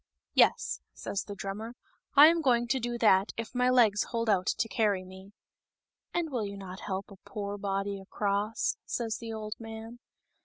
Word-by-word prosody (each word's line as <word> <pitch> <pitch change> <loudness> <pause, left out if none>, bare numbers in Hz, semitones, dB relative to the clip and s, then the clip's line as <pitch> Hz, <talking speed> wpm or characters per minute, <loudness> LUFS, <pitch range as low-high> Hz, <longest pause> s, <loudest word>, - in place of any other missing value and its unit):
" - - -64
Yes," 475 - +3
says 200 - -3
the 205 - -7
drummer, 210 +5 -5 0.2
" - - -44
I 290 - +12
am 330 +1 +5
going 240 -4 +3
to 265 - +2
do 240 0 -2
that 200 -4 +4
if 230 0 -5
my 250 0 +3
legs 225 -5 +4
hold 230 -2 0
out 185 -1 +1
to - - +1
carry 210 -5 +1
me." 190 +1 -12 0.4
" - - -56
And 335 -3 0
will 245 -4 -1
you 200 0 -7
not 190 -1 -8
help 195 +1 -4
a 200 - -12
poor 205 -1 -5
body 195 0 -2
across 200 +2 -1
?" - - -62
says 225 -2 -2
the 230 -1 -6
old 215 -1 -4
man. 225 +1 -8
215 Hz, 200 wpm, -30 LUFS, 200-235 Hz, 0.4 s, I